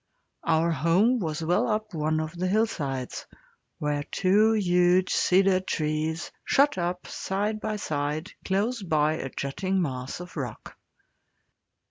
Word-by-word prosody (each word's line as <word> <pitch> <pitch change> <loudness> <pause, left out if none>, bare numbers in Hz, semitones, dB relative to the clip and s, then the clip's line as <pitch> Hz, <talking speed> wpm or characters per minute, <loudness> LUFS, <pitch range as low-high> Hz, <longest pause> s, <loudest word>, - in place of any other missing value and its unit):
Our 165 +1 +2
home 185 +10 +3
was 160 -3 -3
well 180 +9 +2
up 215 -2 -2
one 155 0 0
of 155 +2 -4
the 180 +2 -1
hillsides, 150 - -1 0.5
where 150 -1 -1
two 200 +8 +3
huge 180 -2 +3
cedar 190 0 +4
trees 160 -2 -2
shot 285 +1 +3
up 180 +1 -2
side 205 +3 -2
by 215 -1 -2
side 155 -2 -3
close 210 +5 0
by 155 -4 +2
a 135 - -4
jutting 185 +10 -2
mass 130 -5 -3
of 180 0 -9
rock. 135 -6 -6
175 Hz, 130 wpm, -27 LUFS, 155-195 Hz, 0.5 s, cedar